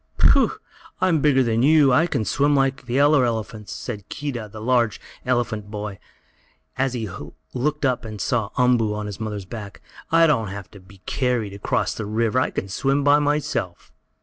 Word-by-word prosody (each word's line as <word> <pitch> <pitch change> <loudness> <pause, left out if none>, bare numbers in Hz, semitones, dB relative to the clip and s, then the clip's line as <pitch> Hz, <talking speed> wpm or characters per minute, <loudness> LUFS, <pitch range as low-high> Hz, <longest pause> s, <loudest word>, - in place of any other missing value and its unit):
"Pooh! - - +4 0.5
I'm 170 -5 +2
bigger 135 -3 +4
than 115 -1 +1
you! 145 -1 +5
I 160 +7 +4
can 110 - -1
swim 145 +4 +2
like 135 -2 0
the 125 +3 +1
other 145 -1 +5
elephants!" 110 -3 -3
said 105 -6 -6
Keedah; 125 -7 -5
a 110 - -9
large 120 -1 +1 0.3
elephant 115 -4 -1
boy, 105 -2 -6 0.8
as 130 -1 0
he 115 -3 -3 0.5
looked 150 +3 -1
up 130 -2 0
and 110 -2 -7
saw 115 -1 0
Umboo 120 -4 +3
on 105 0 -4
his 105 0 -6
mother's 105 -3 -4
back. 105 -1 -8 0.3
"I 165 0 +6
don't 130 -9 +2
have 100 -1 -8
to 100 - -13
be 95 +1 -18
carried 125 -6 -1
across 100 - -1
a 110 - -3
river! 115 +3 +1
I - - +1
can 95 - -4
swim 135 +9 0
by 145 +1 +5
myself." 145 -11 -2
120 Hz, 180 wpm, -23 LUFS, 105-135 Hz, 0.8 s, I